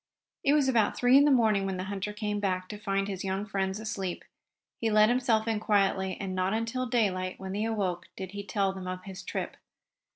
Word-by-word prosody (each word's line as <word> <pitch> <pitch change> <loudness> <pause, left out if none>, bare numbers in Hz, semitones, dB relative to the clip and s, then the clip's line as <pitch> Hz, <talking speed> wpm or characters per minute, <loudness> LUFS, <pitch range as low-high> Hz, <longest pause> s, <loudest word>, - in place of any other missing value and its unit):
It 280 -2 +4
was 295 -3 +3
about 230 -5 +2
three 245 +1 +5
in 280 +1 +7
the - - +5
morning 220 -7 +3
when 190 -1 -2
the 185 - -3
hunter 200 +1 -3
came 210 0 -2
back, 185 -2 -1
to 210 - -6
find 195 -1 -1
his 190 -2 -4
young 195 +1 -2
friends 195 -1 -2
asleep. 195 -4 -4 0.5
He 225 - +1
let 215 0 +5
himself 235 -3 +2
in 220 -2 +1
quietly, 195 -3 +1
and 195 -2 -3
not 185 +2 0
until 230 +3 -2
daylight, 190 -6 0
when 190 0 -6
they 205 +3 -1
awoke, 190 -6 -2
did 190 -1 -6
he 205 0 -6
tell 195 0 0
them 190 -1 -7
of 185 0 -5
his 195 -1 -8
trip. - - -4
200 Hz, 220 wpm, -29 LUFS, 190-220 Hz, 0.5 s, in